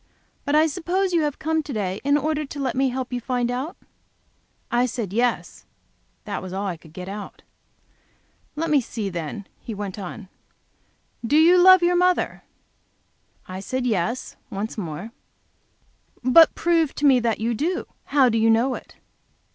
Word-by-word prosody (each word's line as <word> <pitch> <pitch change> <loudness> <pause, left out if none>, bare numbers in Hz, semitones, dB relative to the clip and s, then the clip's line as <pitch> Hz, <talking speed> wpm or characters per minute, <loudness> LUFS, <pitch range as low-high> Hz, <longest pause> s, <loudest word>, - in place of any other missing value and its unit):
But 285 0 +1
I 310 +1 +6
suppose 360 +4 -1
you 335 - +3
have 295 -2 -1
come 320 0 -1
here - - +2
to 290 -2 -7
day 195 -3 -2
in 285 +1 +3
order 305 +1 -1
to 290 0 -8
let 270 - -1
me 265 0 +1
help 255 0 -4
you 245 - -1
to 235 - -20
find 245 -2 0
out?" 265 +7 -4 0.9
I 245 +1 +2
said, 225 -5 -4
"Yes"; 240 +2 -1 0.6
that 205 -2 -4
was 185 0 -7
all 195 +2 -3
I 185 -3 -2
could 160 -1 -17
get 180 +3 -8
out. 205 +1 -8 1.1
"Let 325 +1 -2
me 290 -3 +4
see, 220 -3 -4
then," 175 +3 -5
he 225 - -7
went 200 -1 -5
on. 195 +2 -7 1.0
"Do 260 +6 +2
you 335 +3 +6
love 370 0 +7
your 350 +1 +3
mother?" 360 0 +1 1.1
I 185 0 -6
said 255 +6 -3
"Yes," 230 +2 -1
once 210 0 -4
more. 180 +2 -6 1.1
"But 310 +6 +6
prove 330 -4 +1
to 295 - -1
me 265 -3 +6
that 230 -2 0
you 230 +2 0
do. 340 +11 -1 0.2
How 275 -2 +4
do 225 -2 +1
you 225 +1 +3
know 235 +4 +3
it?" - - -9
250 Hz, 180 wpm, -23 LUFS, 210-305 Hz, 1.1 s, love